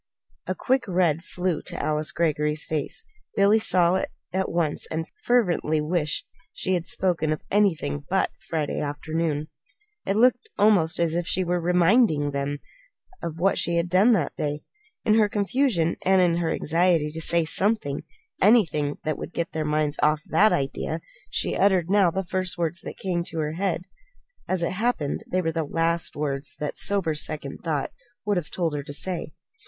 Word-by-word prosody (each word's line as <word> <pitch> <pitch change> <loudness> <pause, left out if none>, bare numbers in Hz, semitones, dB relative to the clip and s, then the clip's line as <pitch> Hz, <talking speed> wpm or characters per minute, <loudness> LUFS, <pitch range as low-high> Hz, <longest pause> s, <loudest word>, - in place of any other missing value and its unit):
A - - -1
quick 260 -2 0
red 175 -4 +1
flew 180 -3 -2
to - - -7
Alice 155 0 0
Greggory's 150 -2 0
face. 155 - -3 0.3
Billy 205 +2 +5
saw 180 -3 +3
it - - -2 0.2
at 190 0 0
once 165 -3 -1
and 160 0 -2 0.2
fervently 180 -10 +2
wished 155 0 0 0.3
she 185 - -1
had 175 -2 -1
spoken 170 -5 0
of 155 - -3
anything 165 -8 +1
but 190 +1 +1
that - - -35
Friday 155 -3 -1
afternoon. 155 +1 -2 0.6
It 195 - +1
looked 245 +2 +3
almost 200 -6 +3
as 170 -2 +1
if 170 0 -1
she 185 - +1
were 175 0 0
reminding 175 - +3
them 140 +1 -2 0.6
of 165 -1 -5
what 190 +4 +2
she 170 0 +1
had 170 +1 0
done 195 +6 +5
that 170 -9 0
day. 150 0 -3 0.4
In 215 - +4
her 210 -1 +4
confusion, 205 - +1
and 190 0 +4
in 175 -2 +3
her 170 -2 0
anxiety 165 -1 +2
to 160 +1 -5
say 170 0 +4
something 185 -4 +1 0.4
anything 165 -10 +3
that 155 -1 -2
would - - -7
get 170 - -2
their 155 -1 -2
minds 150 -1 0
off 150 0 +2
that 205 +7 +4
idea 135 -1 -1 0.3
she - - -1
uttered 190 -3 +2
now 200 -3 +5
the 190 +3 -2
first 185 0 -3
words 170 0 -2
that - - -8
came 180 -3 -1
into 170 -1 -4
her 155 -1 -1
head. 180 +1 -1 0.6
As 185 -2 0
it - - 0
happened, 190 -7 -1
they 185 0 +1
were 165 - 0
the 165 0 -1
last 165 +2 0
words 140 -1 -3
that 150 - -4
sober 195 -6 +2
second 150 -2 -4
thought 155 -5 -1 0.3
would 205 -2 +1
have 170 -4 -3
told 170 -4 -1
her 145 - -2
to 145 0 -8
say. 165 0 -3
170 Hz, 180 wpm, -25 LUFS, 155-190 Hz, 0.6 s, Billy